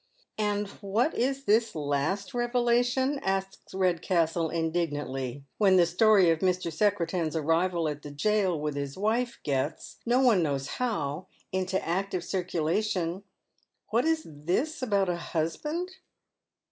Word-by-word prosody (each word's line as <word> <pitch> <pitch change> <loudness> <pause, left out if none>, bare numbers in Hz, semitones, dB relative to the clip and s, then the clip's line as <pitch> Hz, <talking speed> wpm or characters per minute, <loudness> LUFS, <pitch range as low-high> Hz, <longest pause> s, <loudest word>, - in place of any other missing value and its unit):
And 205 -1 0
what 215 +9 +1
is 270 +2 -1
this 225 -2 +2
last 150 +6 -1
revelation? 245 +3 +1
asks 195 0 -3
Redcastle 170 -3 +1
indignantly, 145 -5 -2 0.2
when 195 -3 +5
the 175 - +6
story 185 0 +5
of 165 - 0
IMr. 180 -2 0
Secretan's 175 -3 0
arrival 165 +2 +1
at 150 -1 -4
the 145 - -8
jail 185 +3 +1
with 150 0 -2
his 140 +1 -4
wife 230 +5 0
gets, 140 +2 -2
no 240 +2 +2
one 240 -8 +5
knows 140 -4 -1
how, 180 - -2 0.2
into 190 0 0
active 185 +1 -1
circulation, 180 0 -1 0.3
— - - -44
what 235 +5 +2
is 320 -1 +1
tliis 180 - -2
about 200 -6 +1
a 175 -1 0
husband 300 - -3
185 Hz, 135 wpm, -28 LUFS, 160-215 Hz, 0.3 s, the